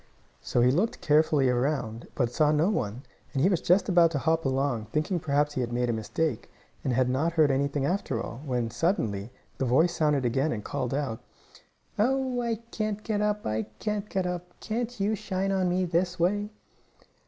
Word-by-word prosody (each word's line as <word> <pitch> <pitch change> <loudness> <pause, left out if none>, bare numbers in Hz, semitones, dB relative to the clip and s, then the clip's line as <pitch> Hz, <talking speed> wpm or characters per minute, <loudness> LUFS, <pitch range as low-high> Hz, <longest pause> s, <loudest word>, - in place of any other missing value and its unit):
So 120 - 0
he 125 +1 +5
looked 185 - 0
carefully 150 -2 +3
around, 125 -3 -1
but 125 -3 +1
he - - -17
saw 150 +2 +3
no 155 +6 +3
one, 120 - -2 0.3
and 135 - +1
he 185 - +5
was 180 -4 +1
just 180 +3 +3
about 175 -3 +5
to 160 - -2
hop 165 +2 +1
along, 135 -4 0
thinking 155 - -1
perhaps 145 -1 +1
he 130 - -1
had 120 -1 -2
made 120 0 0
a - - -1
mistake, 115 +4 -2 0.3
and 130 - 0
had 125 +1 +2
not 145 +7 0
heard 155 -4 +4
anything 140 +1 0
after 160 - -1
all, 115 +2 -6
when, 125 -5 -1
suddenly, 110 - -1 0.3
the 135 - +1
voice 160 +8 +3
sounded 150 -5 +1
again, 135 +6 +1
and 105 -3 -3
called 135 -2 -2
out: 135 -6 -2 0.8
"Oh, 260 +2 +1
I 235 -1 0 0.2
can't 215 -1 -2
get 210 -2 -1
up! 210 0 0
I 110 0 -1
can't 210 -1 -3
get 190 -1 -1
up! 180 0 -5
Can't 235 +1 -3
you 200 +2 +1
shine 195 -2 -2
on 190 -2 +1
me 180 +1 +1
this 175 +1 0
way?" 205 +4 +1
155 Hz, 200 wpm, -27 LUFS, 130-190 Hz, 0.8 s, he